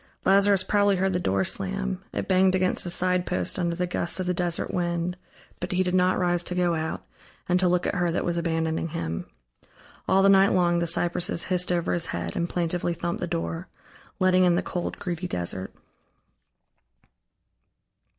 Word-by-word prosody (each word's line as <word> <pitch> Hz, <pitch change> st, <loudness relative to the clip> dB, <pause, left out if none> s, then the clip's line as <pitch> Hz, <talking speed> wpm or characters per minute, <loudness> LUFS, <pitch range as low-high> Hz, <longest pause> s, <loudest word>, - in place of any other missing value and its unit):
Lazarus 195 Hz, 0 st, +4 dB
probably 205 Hz, 0 st, +2 dB
heard 190 Hz, +1 st, 0 dB
the 180 Hz, -, +1 dB
door 95 Hz, -, 0 dB
slam; 60 Hz, -11 st, 0 dB
it -, -, -4 dB
banged 185 Hz, 0 st, +3 dB
against 185 Hz, 0 st, +1 dB
the 175 Hz, -, -3 dB
side 180 Hz, +1 st, +2 dB
post 180 Hz, +1 st, 0 dB
under 170 Hz, -1 st, -1 dB
the 180 Hz, +1 st, -1 dB
gusts 175 Hz, 0 st, 0 dB
of 185 Hz, -, -2 dB
the 180 Hz, -, 0 dB
desert 175 Hz, -1 st, -1 dB
wind, 175 Hz, 0 st, -1 dB, 0.4 s
but -, -, -4 dB
he 185 Hz, +1 st, +2 dB
did 180 Hz, -1 st, -2 dB
not 185 Hz, 0 st, +3 dB
rise 175 Hz, -1 st, +1 dB
to 180 Hz, -, -4 dB
go 175 Hz, -1 st, +1 dB
out 160 Hz, 0 st, -4 dB, 0.4 s
and 180 Hz, 0 st, +2 dB
to 185 Hz, -, +2 dB
look 180 Hz, 0 st, +1 dB
at -, -, -1 dB
her 175 Hz, -3 st, 0 dB
that 165 Hz, -, -2 dB
was 175 Hz, -, 0 dB
abandoning 165 Hz, -1 st, -1 dB
him. 85 Hz, -, -5 dB, 0.8 s
All 190 Hz, +1 st, +3 dB
the -, -, +5 dB
night 195 Hz, 0 st, +5 dB
long 175 Hz, -2 st, +2 dB
the 170 Hz, -, -1 dB
cypresses 170 Hz, 0 st, 0 dB
hissed 180 Hz, -1 st, 0 dB
over 175 Hz, 0 st, 0 dB
his 170 Hz, -1 st, +1 dB
head 85 Hz, 0 st, -4 dB
and 170 Hz, -, -1 dB
plaintively 175 Hz, 0 st, -1 dB
thumped 170 Hz, +1 st, -4 dB
the 175 Hz, -, -2 dB
door, 165 Hz, +1 st, -4 dB, 0.5 s
letting 185 Hz, -1 st, +3 dB
in 175 Hz, -1 st, +4 dB
the -, -, 0 dB
cold, 175 Hz, -, -4 dB
greedy 180 Hz, 0 st, -4 dB
desert. 95 Hz, -, -2 dB
175 Hz, 190 wpm, -25 LUFS, 170-185 Hz, 0.8 s, the